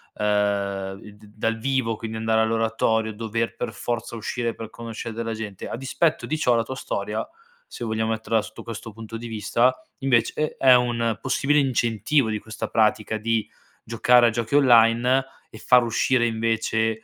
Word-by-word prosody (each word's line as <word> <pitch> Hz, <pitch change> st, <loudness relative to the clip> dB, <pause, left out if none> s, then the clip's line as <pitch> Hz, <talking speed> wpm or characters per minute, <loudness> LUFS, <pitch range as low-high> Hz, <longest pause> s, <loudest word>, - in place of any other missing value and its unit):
ehm, 100 Hz, -2 st, -1 dB
i 105 Hz, -, -12 dB
d 105 Hz, +1 st, -18 dB
dal 115 Hz, +1 st, -1 dB
vivo, 130 Hz, -2 st, 0 dB
quindi 110 Hz, 0 st, -6 dB
andare 110 Hz, 0 st, +1 dB
all'oratorio, 110 Hz, 0 st, +1 dB
dover 115 Hz, +1 st, -3 dB
per 120 Hz, -1 st, -4 dB
forza 120 Hz, +2 st, -4 dB
uscire 115 Hz, +1 st, -3 dB
per 110 Hz, -1 st, -8 dB
conoscere 115 Hz, 0 st, -7 dB
della 115 Hz, 0 st, -3 dB
gente. 105 Hz, -3 st, -6 dB
A -, -, -4 dB
dispetto 145 Hz, +5 st, 0 dB
di 155 Hz, -, -2 dB
ciò 125 Hz, -5 st, +2 dB
la 115 Hz, -, +2 dB
tua 130 Hz, +4 st, -6 dB
storia, 105 Hz, -4 st, -3 dB, 0.4 s
se 120 Hz, -, -7 dB
vogliamo 110 Hz, 0 st, -1 dB
metterla 110 Hz, 0 st, 0 dB
sotto -, -, -10 dB
questo 115 Hz, 0 st, -7 dB
punto 115 Hz, +1 st, -9 dB
di 115 Hz, +1 st, -6 dB
vista, 115 Hz, +3 st, +1 dB, 0.3 s
invece 135 Hz, +3 st, +1 dB
è 130 Hz, -1 st, +6 dB
un 120 Hz, -2 st, +1 dB
possibile 135 Hz, +3 st, +2 dB
incentivo 125 Hz, 0 st, +1 dB
di 110 Hz, -1 st, -2 dB
questa 110 Hz, +1 st, -6 dB
pratica 110 Hz, 0 st, +1 dB
di 110 Hz, 0 st, -1 dB, 0.4 s
giocare 120 Hz, +1 st, +4 dB
a -, -, +4 dB
giochi 115 Hz, +4 st, -2 dB
online 125 Hz, 0 st, +5 dB, 0.3 s
e -, -, -12 dB
far 125 Hz, -1 st, +5 dB
uscire, 120 Hz, +2 st, +1 dB
invece, 110 Hz, 0 st, 0 dB
115 Hz, 170 wpm, -24 LUFS, 110-120 Hz, 0.4 s, è